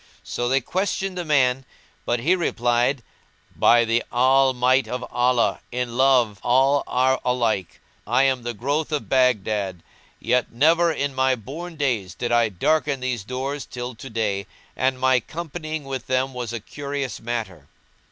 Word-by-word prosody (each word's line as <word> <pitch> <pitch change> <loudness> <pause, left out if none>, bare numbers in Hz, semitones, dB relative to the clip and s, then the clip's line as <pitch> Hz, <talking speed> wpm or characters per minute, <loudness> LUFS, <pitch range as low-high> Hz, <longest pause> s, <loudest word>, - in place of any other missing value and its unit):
So 120 0 -2
they 135 +1 +2
questioned 190 +5 -2
the 180 - -3
man 135 -4 +2 0.4
but 120 -1 0
he 170 +9 +3
replied, 120 -5 0 0.5
"By 120 0 +5
the 115 +1 +1
All 130 +2 +4
might 130 +1 +2
of 125 0 -4
Allah, 125 -1 +2
in 125 -1 -3
love 125 -6 +3
all 135 +3 +3
are 130 +1 +2
alike![FN#185] 115 -8 -1 0.3
I 125 +2 +4
am 130 -2 +2
the 120 0 -5
growth 145 +8 -1
of 150 -2 -2
Baghdad, 105 -8 +1 0.4
yet 125 0 0
never 165 +7 +3
in 140 -3 -2
my 130 0 +2
born 155 - -8
days 115 - -1
did 120 -1 -3
I 120 -1 +3
darken 140 - 0
these 125 -4 -3
doors 130 +5 -4
till 125 0 -6
to 135 +4 -10
day 105 -3 -2 0.3
and 130 0 0
my 130 0 +4
companying 155 +2 -6
with 135 -2 -6
them 130 +1 0
was 125 -2 -4
a 115 - -4
curious 140 +3 -5
matter." 115 -1 -5
130 Hz, 160 wpm, -23 LUFS, 120-140 Hz, 0.5 s, By